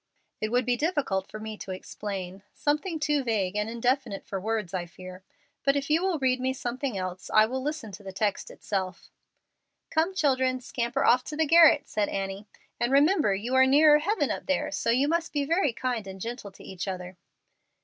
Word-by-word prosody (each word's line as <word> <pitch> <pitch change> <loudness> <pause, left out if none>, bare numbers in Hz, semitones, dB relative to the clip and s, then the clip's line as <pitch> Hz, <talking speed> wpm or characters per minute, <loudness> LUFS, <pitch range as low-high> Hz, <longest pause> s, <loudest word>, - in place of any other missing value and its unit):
"It 215 - -1
would 245 +1 +1
be 245 0 +2
difficult 270 - -1
for 215 - -8
me 215 0 -6
to - - -8
explain 190 0 -6
something 305 +3 -1
too 295 -2 +1
vague 205 -5 -1
and 210 +1 -1
indefinite 235 -2 -1
for 195 -1 -4
words, 215 -3 -2
I 175 -2 -2
fear. 185 +2 -11 0.4
But 275 0 +3
if 280 +1 -2
you 320 +2 +4
will 375 -3 +1
read 260 -2 +1
me 260 +1 0
something 255 -2 -3
else 185 -1 -5
I 215 0 +6
will 260 +4 -3
listen 290 -6 -4
to 195 +2 -10
the 195 - -7
text 205 +1 -1
itself." 190 -3 -4 0.8
"Come, 330 +4 +1
children, 260 -5 +2
scamper 240 -1 -2
off 250 +1 +5
to 300 - -6
the 320 - +3
garret," 320 -1 +6
said 210 -1 -1
Annie, 195 +1 -4 0.3
"and 240 +2 0
remember 290 - +4
you 230 +6 -4
are 260 0 +6
nearer 295 +2 +6
heaven 315 -3 0
up - - -5
there, 280 - +1
and - - -6
so 230 - 0 0.2
must 330 +1 -1
be 290 -1 0
very 330 -2 +2
kind 235 -3 -3
and 190 0 -8
gentle 230 -1 -6
to - - -15
each 190 0 -6
other." 185 -1 -5
245 Hz, 200 wpm, -27 LUFS, 195-290 Hz, 0.8 s, I